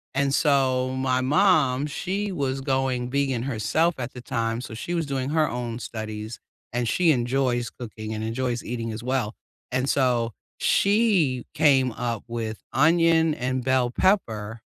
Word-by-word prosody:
And 140 Hz, 0 st, +1 dB
so, 130 Hz, -4 st, +2 dB
my 130 Hz, -1 st, +1 dB
mom, 145 Hz, -3 st, +3 dB
she 195 Hz, +6 st, -3 dB
was 135 Hz, -6 st, -2 dB
going 130 Hz, -2 st, 0 dB
vegan 135 Hz, -3 st, 0 dB
herself 140 Hz, +7 st, +1 dB
at 125 Hz, 0 st, -5 dB
the 125 Hz, -, -8 dB
time, 115 Hz, -1 st, -2 dB
so 120 Hz, -, -8 dB
she 120 Hz, +10 st, -5 dB
was 165 Hz, -3 st, 0 dB
doing 135 Hz, -1 st, -2 dB
her 155 Hz, 0 st, +2 dB
own 120 Hz, -1 st, -4 dB
studies, 110 Hz, -1 st, -6 dB, 0.3 s
and 120 Hz, -1 st, 0 dB
she 175 Hz, +4 st, +3 dB
enjoys 125 Hz, -2 st, 0 dB
cooking, 110 Hz, -2 st, -7 dB
and 110 Hz, 0 st, -4 dB
enjoys 120 Hz, +2 st, -2 dB
eating 115 Hz, -1 st, -4 dB
as 110 Hz, +2 st, -6 dB
well, 125 Hz, -4 st, -1 dB, 0.4 s
and 130 Hz, +1 st, 0 dB
so, 120 Hz, -4 st, +1 dB, 0.2 s
she 195 Hz, -, +2 dB
came 135 Hz, -4 st, +4 dB
up 115 Hz, -3 st, -3 dB
with 115 Hz, -2 st, -4 dB, 0.2 s
onion, 165 Hz, +2 st, +4 dB
and 130 Hz, 0 st, -2 dB
bell 130 Hz, -1 st, +2 dB
pepper, 115 Hz, -, 0 dB
130 Hz, 155 wpm, -25 LUFS, 120-140 Hz, 0.4 s, came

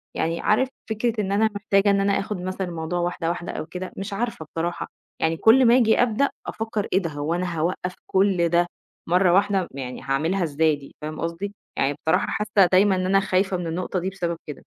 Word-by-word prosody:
يعني 165 Hz, +1 st, -1 dB
عارف 255 Hz, +5 st, +2 dB, 0.2 s
فكرة 220 Hz, 0 st, 0 dB
إن 195 Hz, -1 st, -2 dB
أنا 220 Hz, +2 st, +3 dB
محتاجة 200 Hz, 0 st, +2 dB
إن 200 Hz, 0 st, +2 dB
أنا 200 Hz, 0 st, +2 dB
آخد 200 Hz, 0 st, -3 dB
مثلًا 185 Hz, +1 st, -3 dB
الموضوع 170 Hz, 0 st, -3 dB
واحدة 175 Hz, -1 st, -1 dB
واحدة 175 Hz, 0 st, -3 dB
أو -, -, -5 dB
كده، 180 Hz, +2 st, -6 dB
مش 200 Hz, +1 st, -5 dB
عارفة 225 Hz, -6 st, -3 dB
بصراحة، 165 Hz, +3 st, -3 dB, 0.3 s
يعني 160 Hz, 0 st, +1 dB
كل 250 Hz, +7 st, +6 dB
ما 235 Hz, +1 st, +6 dB
آجي 225 Hz, -3 st, +4 dB
أبدأ، 245 Hz, +3 st, +2 dB, 0.2 s
أفكّر 220 Hz, -1 st, -3 dB
"إيه 190 Hz, -, +5 dB
ده؟ 170 Hz, -4 st, -3 dB
هو 145 Hz, +2 st, -2 dB
أنا 175 Hz, -1 st, -2 dB
هاوقّف 180 Hz, +2 st, -2 dB
كل 190 Hz, -3 st, +2 dB
ده 175 Hz, +1 st, +3 dB, 0.4 s
مرة 180 Hz, +1 st, +4 dB
واحدة، 195 Hz, -1 st, +2 dB
يعني 130 Hz, -2 st, -6 dB
هاعملها 160 Hz, +8 st, 0 dB
إزاي 155 Hz, 0 st, +2 dB
دي؟!" 140 Hz, -1 st, -14 dB
فاهم 155 Hz, +1 st, -5 dB
قصدي؟ 170 Hz, +5 st, -3 dB, 0.2 s
يعني 135 Hz, +1 st, +2 dB
بصراحة 160 Hz, -, +3 dB
حاسّة 210 Hz, -2 st, +3 dB
دايمًا 190 Hz, +1 st, +5 dB
إن 185 Hz, 0 st, -1 dB
أنا 195 Hz, +1 st, +4 dB
خايفة 190 Hz, 0 st, +1 dB
من 175 Hz, -1 st, -4 dB
النقطة 180 Hz, +2 st, -2 dB
دي 185 Hz, +2 st, -2 dB
بسبب 170 Hz, -3 st, -3 dB
كده. 150 Hz, -, -8 dB
185 Hz, 205 wpm, -24 LUFS, 165-200 Hz, 0.4 s, كل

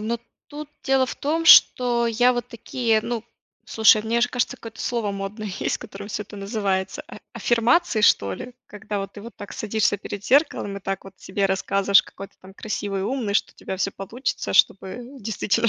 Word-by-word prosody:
но 230 Hz, +2 st, -2 dB, 0.3 s
тут 295 Hz, 0 st, -8 dB
дело 265 Hz, -1 st, +2 dB
в -, -, -5 dB
том, 320 Hz, +3 st, -1 dB
что 240 Hz, -7 st, +6 dB
я 245 Hz, +2 st, +3 dB
вот 240 Hz, -1 st, -3 dB
такие 230 Hz, -1 st, 0 dB
ну, 235 Hz, -1 st, -4 dB, 0.4 s
слушай, 220 Hz, -1 st, +5 dB
мне 230 Hz, +2 st, 0 dB
аж 245 Hz, +1 st, +2 dB
кажется, 245 Hz, -2 st, -1 dB
какое-то 225 Hz, -1 st, -10 dB
слово 230 Hz, -4 st, -1 dB
модное 200 Hz, +2 st, -5 dB
есть, -, -, -1 dB
которым 200 Hz, +1 st, -9 dB
всё 210 Hz, -, -3 dB
это 205 Hz, +1 st, -12 dB
называется, 195 Hz, -2 st, -2 dB
а -, -, -10 dB, 0.2 s
аффирмации 240 Hz, +1 st, +2 dB
что 100 Hz, -, +4 dB
ли? 250 Hz, -, -8 dB
Когда 210 Hz, 0 st, -5 dB
вот 195 Hz, 0 st, -5 dB
ты 205 Hz, -, -10 dB
вот 235 Hz, -, -10 dB
так 205 Hz, -, -9 dB
садишься 215 Hz, -1 st, 0 dB
перед 200 Hz, 0 st, -7 dB
зеркалом 260 Hz, -7 st, +2 dB
и 200 Hz, -, -7 dB
так 195 Hz, 0 st, -4 dB
вот 195 Hz, -1 st, -12 dB
себе 195 Hz, +1 st, -1 dB
рассказываешь, 195 Hz, +1 st, +3 dB
какой 195 Hz, +1 st, -11 dB
ты, -, -, -34 dB
там, 190 Hz, +1 st, -13 dB
красивый, 200 Hz, -2 st, -4 dB
умный, 235 Hz, -2 st, -2 dB
что -, -, +1 dB
у -, -, -48 dB
тебя 190 Hz, -, -6 dB
всё 195 Hz, -, 0 dB
получится, 225 Hz, +8 st, -4 dB
чтобы 190 Hz, +3 st, +2 dB, 0.2 s
действительно 220 Hz, +1 st, 0 dB
215 Hz, 195 wpm, -23 LUFS, 195-240 Hz, 0.4 s, что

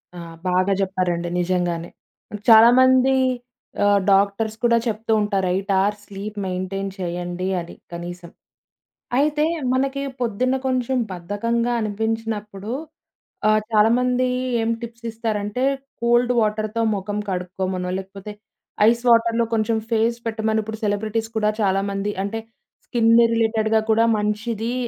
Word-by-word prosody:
ఆ! -, -, -7 dB, 0.3 s
బాగా 185 Hz, +2 st, +2 dB
చెప్పారండి, 180 Hz, -3 st, -1 dB
నిజంగానే. 175 Hz, -1 st, -1 dB, 0.6 s
చాలా 225 Hz, +1 st, +9 dB
మంది 260 Hz, +1 st, +5 dB, 0.7 s
ఆహ్, 205 Hz, 0 st, +4 dB
డాక్టర్స్ 200 Hz, +3 st, +2 dB
కూడా 235 Hz, -1 st, +4 dB
చెప్తూ 225 Hz, 0 st, -2 dB
ఉంటారు 200 Hz, -2 st, 0 dB
8 195 Hz, +2 st, -2 dB
అవర్స్ 205 Hz, +1 st, 0 dB
స్లీప్ 205 Hz, +2 st, -7 dB
మెయింటైన్ 185 Hz, +1 st, -3 dB
చేయండి 175 Hz, 0 st, -3 dB
అని, 170 Hz, 0 st, -8 dB, 0.2 s
కనీసం. 175 Hz, 0 st, -7 dB, 0.9 s
అయితే 300 Hz, +2 st, +2 dB, 0.3 s
మనకి 270 Hz, +1 st, 0 dB, 0.2 s
పొద్దున్న 250 Hz, +2 st, 0 dB
కొంచెం 255 Hz, 0 st, 0 dB
బద్ధకంగా 230 Hz, +7 st, -1 dB
అనిపించినప్పుడు 215 Hz, -1 st, -3 dB, 0.8 s
ఆహ్, 215 Hz, 0 st, +4 dB
చాలామంది 250 Hz, +4 st, +3 dB, 0.3 s
ఏం 225 Hz, -, 0 dB
టిప్స్ 235 Hz, 0 st, -9 dB
ఇస్తారంటే 220 Hz, +1 st, -2 dB, 0.4 s
కోల్డ్ 240 Hz, +1 st, +3 dB
వాటర్‌తో 215 Hz, +1 st, -1 dB
మొఖం 205 Hz, +1 st, -4 dB
కడుక్కోమనో, 185 Hz, 0 st, -3 dB
లేకపోతే 195 Hz, +2 st, -9 dB, 0.6 s
ఐస్ 235 Hz, +1 st, 0 dB
వాటర్‌లో 230 Hz, 0 st, +4 dB
కొంచెం 220 Hz, +1 st, +1 dB
ఫేస్ 230 Hz, +1 st, +2 dB
పెట్టమని 220 Hz, -1 st, 0 dB
ఇప్పుడు 220 Hz, 0 st, -7 dB
సెలబ్రిటీస్ 215 Hz, +2 st, -1 dB
కూడా 210 Hz, -1 st, +2 dB
చాలామంది 195 Hz, +1 st, 0 dB
అంటే 225 Hz, +3 st, -3 dB, 0.5 s
స్కిన్ 230 Hz, -1 st, +3 dB, 0.2 s
రిలేటెడ్‌గా 220 Hz, -1 st, +2 dB
కూడా 225 Hz, +1 st, +4 dB
మంచిది 220 Hz, +2 st, -2 dB
215 Hz, 115 wpm, -22 LUFS, 195-230 Hz, 0.9 s, చాలా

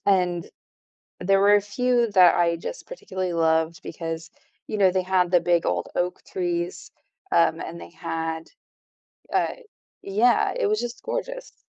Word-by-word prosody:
and 180 Hz, -3 st, +2 dB, 0.7 s
there 195 Hz, +2 st, +3 dB
were 205 Hz, +1 st, +6 dB
a -, -, +3 dB
few 240 Hz, +3 st, +1 dB
that 180 Hz, -3 st, +7 dB
I 170 Hz, -1 st, +3 dB
just 170 Hz, -, -7 dB
particularly 185 Hz, -, -4 dB
loved 160 Hz, +1 st, +1 dB
because, 165 Hz, -1 st, -6 dB, 0.4 s
you 215 Hz, -, -3 dB
know, 190 Hz, -2 st, +5 dB
they 185 Hz, 0 st, +1 dB
had 185 Hz, -1 st, +1 dB
the 175 Hz, -, +6 dB
big 170 Hz, 0 st, +1 dB
old 90 Hz, -1 st, -1 dB
oak 180 Hz, 0 st, -1 dB
trees, 175 Hz, -1 st, -3 dB, 0.4 s
um, -, -, +3 dB
and 85 Hz, -, -7 dB
they 85 Hz, -, -10 dB
had, 160 Hz, 0 st, -4 dB, 0.8 s
uh -, -, +1 dB, 0.5 s
yeah, 215 Hz, +5 st, +3 dB
it 475 Hz, -, +1 dB
was 430 Hz, +1 st, +1 dB
just 240 Hz, 0 st, -6 dB
gorgeous. -, -, -5 dB
180 Hz, 155 wpm, -24 LUFS, 170-205 Hz, 0.8 s, that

